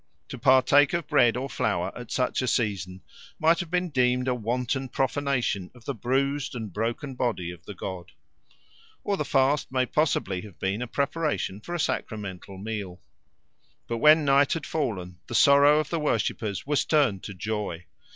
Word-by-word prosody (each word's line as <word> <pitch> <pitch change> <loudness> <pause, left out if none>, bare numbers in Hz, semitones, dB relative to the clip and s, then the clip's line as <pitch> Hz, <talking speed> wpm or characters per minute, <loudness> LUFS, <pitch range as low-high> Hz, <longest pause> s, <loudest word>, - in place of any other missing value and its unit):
To - - -6
partake 135 +4 +5
of 170 -3 -1
bread 120 -1 +4
or 130 +2 -3
flour 90 -9 -1
at 120 -2 -9
such 130 0 0
a 130 - -2
season 95 -6 -1 0.3
might 165 +2 +3
have 175 -3 -4
been 180 +1 0
deemed 125 -1 +2
a 130 - +2
wanton 125 +3 -2
profanation 135 -9 -1
of 120 - -17
the - - -2
bruised 135 +4 -1
and 110 -6 -6
broken 115 +6 -3
body 115 -9 -2
of 90 -2 -13
the 105 - -7
god. 90 -1 -7 0.9
Or 200 - 0
the - - -2
fast 135 +1 +1
may 130 -1 +1
possibly 120 - 0
have 100 -4 -12
been 95 +4 -2
a 125 - -3
preparation 140 - -2
for 175 - -5
a - - -3
sacramental 100 - -4
meal. 100 -3 -5 0.9
But 115 - -2
when 155 +3 +6
night 140 0 +4
had 165 -3 -4
fallen, 95 - -3
the - - -5
sorrow 145 +2 +6
of 155 - -3
the 165 - 0
worshippers 110 -7 -1
was 145 0 +1
turned 135 - +2
to 100 - -7
joy. 100 -3 -4
125 Hz, 175 wpm, -26 LUFS, 100-145 Hz, 0.9 s, when